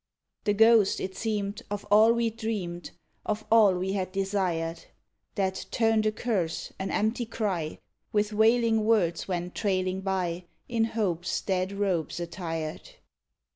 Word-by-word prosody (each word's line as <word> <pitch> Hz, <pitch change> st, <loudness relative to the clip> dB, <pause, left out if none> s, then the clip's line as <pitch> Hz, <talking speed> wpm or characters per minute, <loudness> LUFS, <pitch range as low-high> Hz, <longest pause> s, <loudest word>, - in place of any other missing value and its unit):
The 205 Hz, -1 st, +2 dB
ghost 225 Hz, -1 st, +5 dB
it 190 Hz, 0 st, -4 dB
seemed 210 Hz, -1 st, -2 dB
of 205 Hz, -1 st, -4 dB
all 215 Hz, +2 st, +7 dB
we'd 230 Hz, -1 st, 0 dB
dreamed, 200 Hz, -7 st, -4 dB, 0.3 s
Of 215 Hz, 0 st, -3 dB
all 215 Hz, -4 st, +6 dB
we 185 Hz, +2 st, -2 dB
had 185 Hz, -2 st, -2 dB
desired; 185 Hz, -4 st, -1 dB, 0.5 s
That 190 Hz, -2 st, -1 dB
turned 225 Hz, -2 st, +2 dB
a -, -, +2 dB
curse, 200 Hz, -8 st, -2 dB
an 190 Hz, -, -3 dB
empty 220 Hz, +2 st, 0 dB
cry 190 Hz, -9 st, -2 dB, 0.3 s
With 210 Hz, 0 st, +1 dB
wailing 225 Hz, +1 st, +3 dB
words 200 Hz, -7 st, +2 dB
went 180 Hz, -1 st, -3 dB
trailing 185 Hz, -2 st, -1 dB
by 185 Hz, -2 st, -2 dB, 0.2 s
In 230 Hz, -2 st, +1 dB
hope's 185 Hz, -7 st, -1 dB
dead 185 Hz, -1 st, -1 dB
robes 190 Hz, -5 st, -1 dB
attired. 165 Hz, -2 st, -5 dB
200 Hz, 135 wpm, -28 LUFS, 180-220 Hz, 0.5 s, all